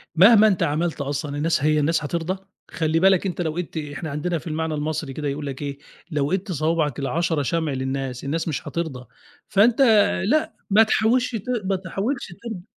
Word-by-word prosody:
مهما 215 +5 +7
أنت 190 -4 +2
عملت 155 +1 -1
أصلًا 145 +1 -3
الناس 160 -1 +1
هي 155 0 +3
الناس 155 +2 +1
هترضى، 170 +5 -3 0.3
خلّي 160 0 0
بالك 190 0 +4
أنت 180 -2 -2
لو 160 -1 -2
ايدْت 175 -2 -4
إحنا 150 +1 -5
عندنا 165 +4 -1
في 160 - -9
المعنى 160 0 -2
المصري 150 -1 -3
كده 150 +1 -4
يقول 145 +1 -3
لك 140 0 -6
إيه، 140 -1 -4 0.3
لو 145 0 0
ايدْت 190 +1 -1
صوابعك 155 -3 0
ال10 160 +2 0
شمع 160 +2 -1
للناس، 130 -1 -3
الناس 160 +5 -2
مش 155 - -3
هترضى، 155 -7 -4 0.4
فأنت 220 +5 +4 0.4
لأ 305 +9 +1 0.2
ما 210 +2 +6
تحاولش 230 +3 +2
ت 210 - -4 0.2
ما 195 0 +1
تحاولش 195 +8 -3 0.2
ترضى 220 -7 -6
160 Hz, 185 wpm, -23 LUFS, 145-190 Hz, 0.4 s, مهما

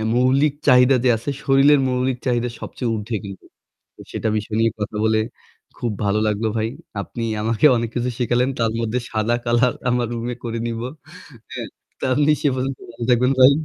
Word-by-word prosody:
মৌলিক 135 +4 +3
চাহিদা 125 +1 +6
যে 125 - +4
আছে 120 +6 -5
শরীরের 140 +1 +5
মৌলিক 125 0 0
চাহিদা 120 -1 +1
সবচেয়ে 120 -3 -3
উর্ধে 110 +2 -4
কিন্তু। 95 -1 -9 0.5
তো - - -14
সেটা - - -2
বিষয় 105 +1 -4
নিয়ে 115 0 +3
কথা 105 0 -4
বলে 110 0 +3 0.6
খুব 120 -2 -2
ভালো 100 +1 +1
লাগলো 105 +1 0
ভাই। 110 0 0 0.3
আপনি 115 +3 -6 0.2
আমাকে 115 +4 +1
অনেক 115 -1 -1
কিছু 120 +1 0
শিখালেন। 125 +2 +1
তার 115 -1 +1
মধ্যে 115 +2 -1
সাদা 110 +2 +1
কলার 120 +1 +2 0.2
আমার 120 -1 +1
রুমে 120 +1 -3
করে 115 -1 -3
নিবো। 115 +1 -3 0.6
হ্যাঁ? - - -5 0.3
তো - - -9
আপনি 150 +3 +3
সে - - +2
পর্যন্ত 130 +1 -2
ভালো 120 - -7
থাকবেন 125 +2 +3
ভাই। 130 +2 +8
120 Hz, 180 wpm, -21 LUFS, 115-125 Hz, 0.6 s, ভাই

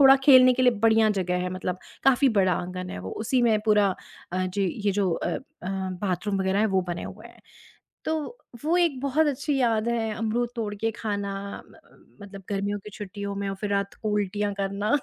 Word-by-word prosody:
थोड़ा 270 -1 +9
खेलने 255 -2 +8
के 255 - +1
लिए 250 - +5
बढ़िया 220 -1 +5
जगह 180 -1 0
है, 180 - -2
मतलब 185 0 -3 0.3
काफ़ी 270 0 +5
बड़ा 185 -2 +4
आँगन 180 +1 -5
है - - -6
वो, 95 +1 -6
उसी 245 +3 0
में 220 -3 +4
पूरा 210 -2 +5 0.4
अ, 185 0 0
जी, 195 +1 -1 0.2
ये 200 - +3
जो 190 -2 +2
अ - - -2
अ, - - -7 0.6
बाथरूम 195 +1 -1
वगैरह 190 +1 +1
हैं, 220 - +4
वो 190 -3 +1
बने 175 -1 -3
हुए 215 +4 -9
हैं। - - -20 0.6
तो 320 - +1 0.5
वो 330 +3 +2
एक 325 -7 +1
बहुत 280 +3 +2
अच्छी 285 +1 -1
याद 225 -2 +2
है, 225 -2 0
अमरूद 225 +2 -1
तोड़ 210 -2 -2
के 225 +2 0
खाना 205 -2 -2 0.3
म - - -19 0.5
मतलब 195 -1 -10
गर्मियों 200 +1 -1
की 210 - -8
छुट्टियों 200 0 -5
में 200 0 -2
और 195 - -2
फिर 210 - -3
रात 200 0 -1
को 215 - -1
उल्टियाँ 205 0 -1
करना। 200 +6 +1
205 Hz, 210 wpm, -26 LUFS, 195-235 Hz, 0.6 s, थोड़ा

